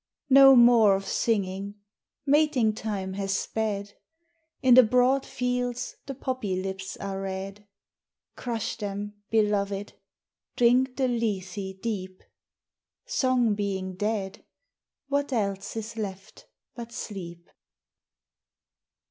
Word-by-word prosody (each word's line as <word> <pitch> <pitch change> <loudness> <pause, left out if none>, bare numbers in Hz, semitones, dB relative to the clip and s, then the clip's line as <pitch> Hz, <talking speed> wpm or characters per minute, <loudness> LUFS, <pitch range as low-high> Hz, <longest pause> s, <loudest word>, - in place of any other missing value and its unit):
No 270 0 +9
more 235 -4 +6
of 195 0 -4
singing; 200 -2 -1 0.5
mating 275 -6 +3
time 200 -3 -4
has 195 0 -1
sped, 205 -2 -3 0.7
In 255 -1 +6
the 255 - +10
broad 250 +3 +2
fields 250 -1 -2
the 275 - -5
poppy 255 -7 -3
lips 190 0 -5
are 195 -1 -5
red. 195 +1 -6 0.7
Crush 235 -3 -3
them, 205 -1 -5 0.2
Beloved, 205 -2 0 0.6
drink 250 +2 +3
the 265 -2 +2
lethe 195 -5 -3
deep; 190 -5 -4 0.8
Song 255 - +2
being 195 -2 -3
dead, 200 0 -3 0.6
what 285 0 -1
else 200 -5 -2
is 225 0 -5
left 195 -3 -7 0.3
but 235 -1 -8
sleep? 175 -6 -7
210 Hz, 105 wpm, -27 LUFS, 195-245 Hz, 0.8 s, the